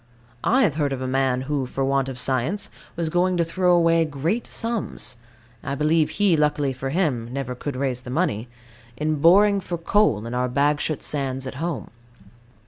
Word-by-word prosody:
I 260 Hz, +2 st, +3 dB
have 150 Hz, -, +1 dB
heard 140 Hz, -2 st, +1 dB
of 130 Hz, -, -4 dB
a -, -, -2 dB
man 130 Hz, -1 st, +1 dB
who, 135 Hz, -1 st, -2 dB
for 135 Hz, +1 st, -2 dB
want 135 Hz, 0 st, +1 dB
of 130 Hz, -, -6 dB
science, 130 Hz, +10 st, 0 dB, 0.2 s
was 165 Hz, -1 st, -1 dB
going 180 Hz, +1 st, +2 dB
to 170 Hz, -, +3 dB
throw 180 Hz, +1 st, +2 dB
away 165 Hz, -1 st, +4 dB
great 160 Hz, -, -2 dB
sums 230 Hz, -, -3 dB, 0.5 s
(I 140 Hz, -, -3 dB
believe 155 Hz, +2 st, +2 dB
he, 200 Hz, -4 st, +4 dB
luckily 150 Hz, -2 st, +1 dB
for 130 Hz, +1 st, -4 dB
him, 135 Hz, -8 st, -1 dB
never 130 Hz, -1 st, -3 dB
could 135 Hz, +2 st, -5 dB
raise 130 Hz, -2 st, -2 dB
the 125 Hz, -, -10 dB
money) 110 Hz, -2 st, -1 dB, 0.5 s
in 155 Hz, +1 st, 0 dB
boring 200 Hz, +5 st, +6 dB
for 175 Hz, -2 st, -4 dB
coal 165 Hz, -, +2 dB
in 115 Hz, -, -5 dB
our 125 Hz, +1 st, 0 dB
Bagshot 145 Hz, +3 st, 0 dB
sands 135 Hz, -2 st, 0 dB
at 130 Hz, -, -5 dB
home. 170 Hz, -3 st, -3 dB
145 Hz, 185 wpm, -23 LUFS, 130-170 Hz, 0.5 s, boring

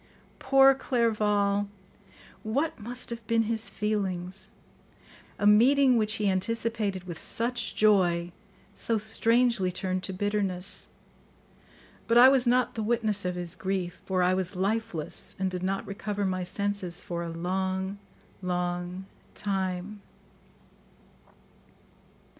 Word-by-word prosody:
Poor 270 Hz, 0 st, +6 dB
Clerval! 210 Hz, -6 st, +1 dB, 0.7 s
What 275 Hz, +9 st, -1 dB
must 245 Hz, +3 st, -6 dB
have 235 Hz, 0 st, -5 dB
been 230 Hz, 0 st, +3 dB
his 225 Hz, 0 st, -2 dB
feelings? 190 Hz, -4 st, -3 dB, 0.9 s
A -, -, -1 dB
meeting, 255 Hz, +5 st, +6 dB
which 215 Hz, -1 st, +1 dB
he 210 Hz, -2 st, 0 dB
anticipated 205 Hz, 0 st, -1 dB
with 175 Hz, -3 st, -7 dB
such 240 Hz, +2 st, 0 dB
joy, 180 Hz, -5 st, +3 dB, 0.4 s
so 230 Hz, +2 st, -1 dB
strangely 225 Hz, -2 st, +2 dB
turned 185 Hz, 0 st, -2 dB
to -, -, -3 dB
bitterness. 195 Hz, -1 st, -2 dB, 1.2 s
But 230 Hz, -, +4 dB
I 250 Hz, +2 st, +10 dB
was 265 Hz, -2 st, +3 dB
not 250 Hz, +1 st, +3 dB
the 225 Hz, -, -4 dB
witness 215 Hz, -3 st, 0 dB
of 180 Hz, 0 st, -1 dB
his 175 Hz, 0 st, -3 dB
grief, 185 Hz, -1 st, -3 dB
for 185 Hz, -1 st, 0 dB
I 180 Hz, +1 st, +3 dB
was 185 Hz, 0 st, -2 dB
lifeless 195 Hz, -4 st, -2 dB
and 190 Hz, -1 st, -1 dB
did 180 Hz, -1 st, -3 dB
not 195 Hz, +1 st, -2 dB
recover 205 Hz, 0 st, -3 dB
my 185 Hz, -1 st, -1 dB
senses 195 Hz, -1 st, -3 dB
for 170 Hz, -1 st, -4 dB
a 170 Hz, -, -4 dB
long, 190 Hz, +3 st, -2 dB, 0.4 s
long 180 Hz, 0 st, -3 dB, 0.3 s
time. 195 Hz, 0 st, -2 dB
200 Hz, 120 wpm, -28 LUFS, 185-225 Hz, 1.2 s, I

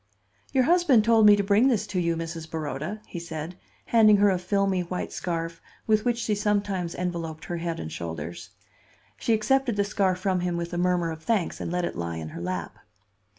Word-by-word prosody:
"Your 260 Hz, -, +3 dB
husband 310 Hz, -7 st, +4 dB
told 225 Hz, -1 st, +5 dB
me 205 Hz, -, +9 dB
to 205 Hz, -, 0 dB
bring 205 Hz, +5 st, +4 dB
this 220 Hz, -6 st, +1 dB
to 185 Hz, -3 st, -2 dB
you, 170 Hz, -1 st, +1 dB
Mrs. 165 Hz, -1 st, -6 dB
Baroda," 155 Hz, +5 st, -4 dB
he 175 Hz, -, -7 dB
said, 165 Hz, 0 st, -6 dB, 0.3 s
handing 215 Hz, -3 st, +6 dB
her 205 Hz, 0 st, +4 dB
a 185 Hz, -, 0 dB
filmy, 195 Hz, 0 st, +1 dB
white 180 Hz, +1 st, -4 dB
scarf 165 Hz, -1 st, -3 dB, 0.2 s
with 215 Hz, 0 st, +2 dB
which 240 Hz, -1 st, +1 dB
she 230 Hz, -2 st, -1 dB
sometimes 200 Hz, -4 st, -1 dB
enveloped 170 Hz, -3 st, -4 dB
her 175 Hz, -, -3 dB
head 165 Hz, 0 st, -3 dB
and 80 Hz, -, -6 dB
shoulders. 80 Hz, 0 st, -6 dB, 0.7 s
She 230 Hz, -, +1 dB
accepted 255 Hz, +2 st, +1 dB
the 205 Hz, -, +2 dB
scarf 195 Hz, -2 st, +1 dB
from 185 Hz, 0 st, 0 dB
him 175 Hz, -1 st, -1 dB
with 170 Hz, 0 st, -4 dB
a -, -, -2 dB
murmur 175 Hz, -2 st, +1 dB
of 160 Hz, -1 st, -8 dB
thanks, 205 Hz, 0 st, -1 dB
and -, -, -3 dB
let 180 Hz, 0 st, 0 dB
it -, -, -4 dB
lie 85 Hz, -1 st, -4 dB
in 80 Hz, -1 st, -6 dB
her 85 Hz, -, -8 dB
lap. 90 Hz, -1 st, -4 dB
180 Hz, 205 wpm, -26 LUFS, 165-210 Hz, 0.7 s, me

